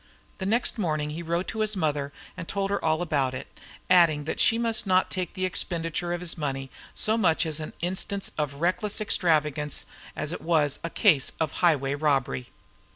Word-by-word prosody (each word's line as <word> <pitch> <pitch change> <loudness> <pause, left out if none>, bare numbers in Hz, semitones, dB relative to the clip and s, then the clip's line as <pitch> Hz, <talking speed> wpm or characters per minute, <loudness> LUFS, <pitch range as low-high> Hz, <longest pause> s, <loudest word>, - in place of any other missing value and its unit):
Next 230 +4 +2
morning 155 -5 -1
he 160 +3 -5
wrote 170 +2 -1
to 220 - -5
his 215 0 +1
mother 145 -5 -1 0.2
and 170 -2 -7
told 195 0 -1
her 200 - -1
all 160 +1 +2
about 135 -6 0
it, - - -6 0.4
adding 170 -5 +5
that 155 - -4
she 230 - +4
must 230 -2 +1
not 185 0 +3
take 185 0 -3
the 185 -1 -1
expenditure 170 -1 -1
of 175 0 -2
his 175 -1 -4
money 135 -3 -3 0.2
so 220 +1 +1
much 170 -4 +3
as 160 -1 -2
an 155 - -6
instance 190 +3 -2
of 145 -2 -2
reckless 180 +8 0
extravagance 150 -7 +1 0.3
as 150 - -3
it - - -5
was 155 -4 +1
a 165 - -2
case 160 - +3
of 155 -3 0
highway 140 -6 +3
robbery. 140 -4 0
165 Hz, 185 wpm, -27 LUFS, 150-185 Hz, 0.4 s, adding